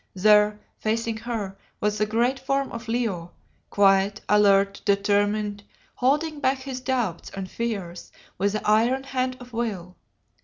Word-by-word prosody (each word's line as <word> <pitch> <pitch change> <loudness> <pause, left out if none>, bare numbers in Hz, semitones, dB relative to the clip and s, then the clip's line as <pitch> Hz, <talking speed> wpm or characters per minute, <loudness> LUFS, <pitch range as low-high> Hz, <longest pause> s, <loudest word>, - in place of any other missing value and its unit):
There, 210 +2 +4 0.2
facing 225 +1 -1
her, 220 -4 -4 0.2
was 210 0 0
the 215 - +2
great 240 +5 +1
form 275 0 -1
of 230 0 -7
Leo, 215 -8 -2 0.4
quiet, 200 +1 +3
alert, 200 -1 +4
determined, 205 +1 +1 0.3
holding 295 +4 0
back 270 -1 +2
his 260 -1 -6
doubts 245 -10 -2
and 195 -1 -4
fears 195 -6 -5 0.3
with 200 +1 +1
the 215 - -3
iron 235 +5 +3
hand 255 -1 -2
of 245 -1 -13
will. 200 -6 -3
215 Hz, 140 wpm, -25 LUFS, 200-245 Hz, 0.4 s, There